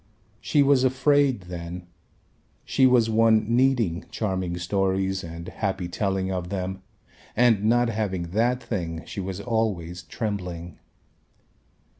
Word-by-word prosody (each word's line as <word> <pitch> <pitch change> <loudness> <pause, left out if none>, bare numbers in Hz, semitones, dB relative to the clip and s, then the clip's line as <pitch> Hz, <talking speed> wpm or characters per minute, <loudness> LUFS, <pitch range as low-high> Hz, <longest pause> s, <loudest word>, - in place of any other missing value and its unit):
She 145 - +3
was 140 -2 +4
afraid 135 -1 +3
then, 90 0 -7 0.8
she 130 - +4
was 125 -3 +4
one 110 0 +3
needing 120 -9 +2
charming 95 -5 -2
stories 95 +1 0
and 85 +1 -8
happy 95 -1 -2
telling 95 +1 -1
of 90 -2 -3
them 95 -1 -4 0.5
and 115 -3 +4
not 120 +1 +3
having 95 -6 -2
that 120 +5 +1
thing 85 -6 -4
she - - -7
was 95 0 -4
always 100 -7 -2
trembling. 90 -5 -5
95 Hz, 120 wpm, -25 LUFS, 90-115 Hz, 0.8 s, was